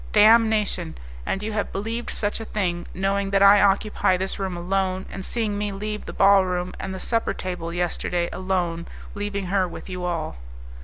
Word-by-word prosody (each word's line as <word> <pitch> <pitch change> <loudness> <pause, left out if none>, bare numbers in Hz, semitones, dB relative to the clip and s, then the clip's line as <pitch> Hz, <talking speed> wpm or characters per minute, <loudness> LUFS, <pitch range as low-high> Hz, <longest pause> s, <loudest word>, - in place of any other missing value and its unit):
"Damnation! 215 -5 +4 0.3
And 195 - -1
you 220 0 -3
have 210 -1 -2
believed 225 +4 -3
such 205 +1 -2
a 225 - -6
thing, 175 -5 -2
knowing 195 +1 0
that 195 0 +3
I 200 0 +8
occupy 200 -1 +3
this 190 +2 -3
room 190 -2 -2
alone, 185 +1 -1
and 195 - -6
seeing 210 -1 -2
me 205 0 -1
leave 210 +2 -5
the - - -4
ball 195 0 +6
room 180 0 -2
and 195 - -4
the 190 - -5
supper 230 +4 0
table 180 -2 -4
yesterday 175 0 -1
alone, 175 -3 -1 0.3
leaving 205 -1 -3
her 190 -2 +3
with 175 - -9
you 180 0 -4
all!" 165 - -2
195 Hz, 185 wpm, -24 LUFS, 180-205 Hz, 0.3 s, I